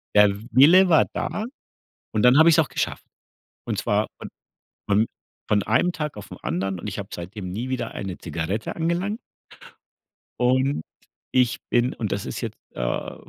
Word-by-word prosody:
der 105 0 +7 0.2
Wille 180 +8 +7
war 160 - +6
da 215 - -2 0.7
und 110 - +1
dann 125 +2 +7
habe 160 +2 +8
ich 165 - +6
es - - +4
auch 155 - +2
geschafft. - - -2 0.6
Und - - -2
zwar - - +1
von - - -8 0.6
von 100 0 +3
von 110 - +3 0.4
von 105 -1 +3
einem 180 - +2
Tag 150 -4 -4
auf 105 - -10
'n - - -8
anderen 95 +2 -2
und 85 - -7
ich 100 - -5
habe 100 -1 -5
seitdem 90 +2 -6
nie 115 +7 -4
wieder 120 -3 -2
eine 95 -2 -5
Zigarette 85 +6 -3
angelangt. 175 +7 -1 1.2
Und 130 - +2 0.5
ich 125 -2 +3
bin 120 +1 +2
und 110 -3 -4
das 100 - -2
ist - - -5
jetzt, - - -5 0.2
äh - - -3
120 Hz, 175 wpm, -24 LUFS, 100-150 Hz, 1.2 s, habe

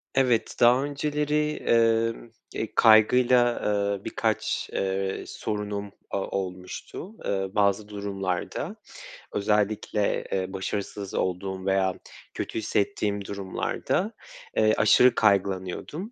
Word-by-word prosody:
Evet, 125 -4 +2
daha 125 +3 +5
önceleri, 150 +1 0
emm, 115 -2 +1 0.2
eee, 110 - -3
kaygıyla, 120 +2 +5
ııı, 100 -1 0
birkaç, - - -1
ııı, 95 0 -1
sorunum 105 -1 -4 0.2
o - - 0
olmuştu, 95 - -5
ııı, 95 0 -2
bazı 105 +1 +2
durumlarda. 95 -3 -3 0.6
Özellikle, 105 0 0
eee, 95 0 -2
başarısız 100 +1 -4
olduğum 95 +1 -2
veya 95 -1 +2 0.4
kötü - - -3
hissettiğim 105 -1 -1
durumlarda, 100 -2 -2 0.5
eee, 110 0 +4
aşırı 120 +3 +6
kaygılanıyordum. 100 - 0
105 Hz, 95 wpm, -26 LUFS, 95-115 Hz, 0.6 s, aşırı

